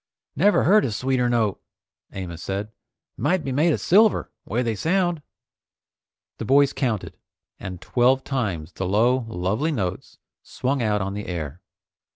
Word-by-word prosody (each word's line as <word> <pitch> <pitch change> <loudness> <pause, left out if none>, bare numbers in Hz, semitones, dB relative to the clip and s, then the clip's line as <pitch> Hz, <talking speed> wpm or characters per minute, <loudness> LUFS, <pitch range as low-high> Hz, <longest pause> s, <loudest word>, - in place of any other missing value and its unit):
"Never 200 +8 +4
heard 210 +2 +5
a 120 - -1
sweeter 125 +2 0
note," 115 -4 0 0.5
Amos 90 -3 -6
said. 100 +2 -4 0.5
"Might 185 -3 +1
be 135 - -3
made 155 +6 +3
of - - 0
silver, 215 +4 +3
'way 120 +3 -1
they 115 -2 0
sound." 175 - 0 1.2
The - - -3
boys 140 +3 +4
counted, 120 -7 -2 0.4
and 90 -2 -7
twelve 130 +5 +2
times 95 - -3
the 95 - -4
low, 120 +6 +2
lovely 110 - -1
notes 95 - -4 0.2
swung 135 +1 -2
out 105 -3 +1
on 95 +1 -3
the 105 +1 -5
air. 85 -2 -5
120 Hz, 150 wpm, -23 LUFS, 95-140 Hz, 1.2 s, heard